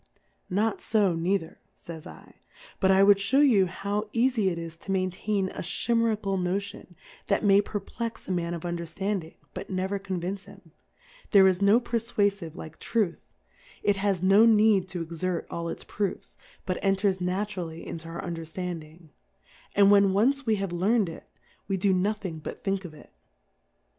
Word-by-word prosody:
Not 210 +4 0
fo 205 -5 +2
neither, 170 0 -1 0.2
fays 165 -2 -10
/, - - -13 0.5
but 190 - +3
I 190 +1 +6
would 200 0 +6
fhew 270 +8 +4
you 200 -7 +4
ho 205 +4 -3
vv 245 +3 +4
eafie 215 -6 +1
it 170 - -4
is 165 -1 -6
to 195 - -7
maintain 190 +1 -1
a - - -6
Chimerical 220 -1 0
Noti 195 +3 -2
on, 175 - -18 0.3
that 200 - +1
may 200 -1 +6
perplex 220 +3 -5
a - - -3
Man 175 -1 -1
of 170 - -7
Un 175 0 -2
dcrilanding, 180 0 -3 0.2
but - - -7
never 190 +1 -2
convince 190 0 -4
him; - - -16 0.6
there 195 -3 +7
is 185 0 +1
no 200 +4 +5
Perfwafive 205 -7 -1
like 160 0 -10
Truth, 210 -7 0 0.6
it 205 -1 +2
has 195 -2 0
no 200 +4 +6
need 210 -4 +4
to 180 -2 -4
exert 170 +2 -3
all 170 0 -3
its - - -6
Proofs, 205 -2 -4 0.3
but 185 -1 -3
enters 195 -1 +1
naturally 180 -3 -3
into 165 0 -7
our 165 - -6
Under 170 -2 -4
ftanding; 165 -1 -7 0.7
and 200 0 +6
when 200 -1 +5
once 260 +6 +2
we 220 - +3
have 195 -3 -3
learn'd 195 +3 +2
it, 165 - -11 0.4
we 195 - 0
do 190 +1 +2
nothing 185 -3 -1
but - - -8
think 195 -1 -1
of 155 -3 -9
it. - - -16
195 Hz, 175 wpm, -27 LUFS, 175-205 Hz, 0.7 s, there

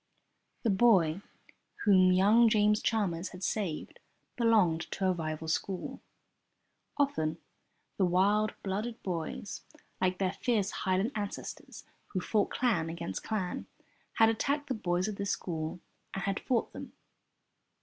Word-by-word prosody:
The 230 - +3
boy 190 -5 +4 0.6
whom 185 -3 +6
young 210 +6 +5
James 210 -1 +3
Chalmers 190 -6 0
had 180 0 -10
saved 180 -4 -3 0.4
belonged 210 -9 +3
to 195 - -2
a 185 - +4
rival 160 -2 -3
school. 185 +3 -3 1.0
Often 175 - +1 0.6
the 190 - +3
wild 200 +4 +2
blooded 210 +4 -3
boys 175 +2 -4 0.4
(like 185 0 +2
their 190 0 0
fierce 215 -5 0
Highland 190 +5 0
ancestors 205 -2 -6 0.2
who 185 - -2
fought 205 +3 +1
clan 205 -11 +1
against 170 +1 -4
clan) 195 -5 -3 0.5
had 225 0 +5
attacked 285 +6 -1
the - - +1
boys 180 -4 0
of 210 -2 -4
this 200 0 -2
school 160 -2 -3 0.4
and 195 - -3
had 195 0 -1
fought 245 -3 -1
them. - - -8
195 Hz, 130 wpm, -31 LUFS, 180-220 Hz, 1.0 s, whom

